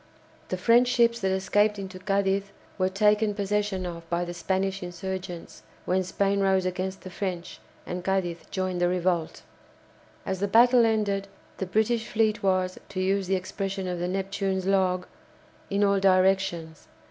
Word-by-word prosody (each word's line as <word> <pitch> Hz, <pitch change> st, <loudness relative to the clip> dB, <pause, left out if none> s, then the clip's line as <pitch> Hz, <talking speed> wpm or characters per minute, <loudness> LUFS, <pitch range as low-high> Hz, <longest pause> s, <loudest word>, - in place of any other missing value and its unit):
The 185 Hz, -, -1 dB
French 235 Hz, +6 st, +4 dB
ships 235 Hz, -1 st, +3 dB
that 190 Hz, -, 0 dB
escaped 205 Hz, +3 st, +2 dB
into 190 Hz, -1 st, -7 dB
Cadiz 195 Hz, +1 st, +1 dB, 0.3 s
were 185 Hz, 0 st, +2 dB
taken 210 Hz, +2 st, +2 dB
possession 205 Hz, -2 st, -1 dB
of 170 Hz, -1 st, -7 dB
by 175 Hz, 0 st, 0 dB
the 175 Hz, -, -5 dB
Spanish 190 Hz, +2 st, -1 dB
insurgents, 180 Hz, -1 st, -6 dB, 0.2 s
when 185 Hz, +1 st, +1 dB
Spain 195 Hz, +2 st, 0 dB
rose 190 Hz, -1 st, +2 dB
against 185 Hz, +1 st, -3 dB
the 185 Hz, -, -9 dB
French, 180 Hz, -2 st, -4 dB, 0.3 s
and 180 Hz, 0 st, -5 dB
Cadiz 180 Hz, -3 st, -1 dB
joined 185 Hz, -2 st, -2 dB
the 175 Hz, -, +4 dB
revolt. 175 Hz, -, -1 dB, 0.8 s
As 190 Hz, -1 st, -2 dB
the 200 Hz, -, 0 dB
battle 235 Hz, +3 st, +6 dB
ended, 200 Hz, -3 st, 0 dB, 0.3 s
the 190 Hz, -, -3 dB
British 220 Hz, +3 st, +1 dB
fleet 215 Hz, -1 st, +1 dB
was, 185 Hz, -1 st, 0 dB
to 190 Hz, -, -5 dB
use 190 Hz, 0 st, +1 dB
the 190 Hz, -, +2 dB
expression 190 Hz, +1 st, -3 dB
of 180 Hz, -1 st, -3 dB
the 175 Hz, -, -1 dB
"Neptune's" 195 Hz, 0 st, -2 dB
log, 185 Hz, -2 st, +2 dB, 0.6 s
"in 200 Hz, +1 st, +1 dB
all 200 Hz, -1 st, +3 dB
directions." 185 Hz, -4 st, +1 dB
190 Hz, 160 wpm, -26 LUFS, 185-200 Hz, 0.8 s, battle